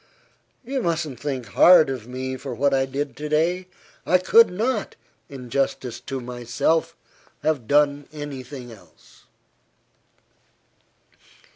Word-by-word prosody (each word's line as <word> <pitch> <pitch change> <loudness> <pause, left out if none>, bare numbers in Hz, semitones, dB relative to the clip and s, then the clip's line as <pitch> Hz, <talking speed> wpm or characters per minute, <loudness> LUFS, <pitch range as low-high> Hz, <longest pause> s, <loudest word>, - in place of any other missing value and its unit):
You 265 +1 -2
mustn't 160 - -2
think 135 -3 -4
hard 175 -3 +7
of 125 -4 -6
me 130 +1 -4
for 130 -1 -6
what 140 +2 +1
I 135 0 +2
did 140 +2 -4
to 150 0 -5
day. 175 +4 +1 0.4
I 185 - +4
could 225 +5 +5
not, 220 +8 -2 0.3
in 125 -4 -10
justice 125 -3 -1
to 135 +1 -5
myself, 125 +6 -1 0.5
have 150 -7 0
done 145 0 +2
any 145 -3 -6
thing 125 -1 -10
else." 90 -8 -19
140 Hz, 125 wpm, -23 LUFS, 125-160 Hz, 0.5 s, hard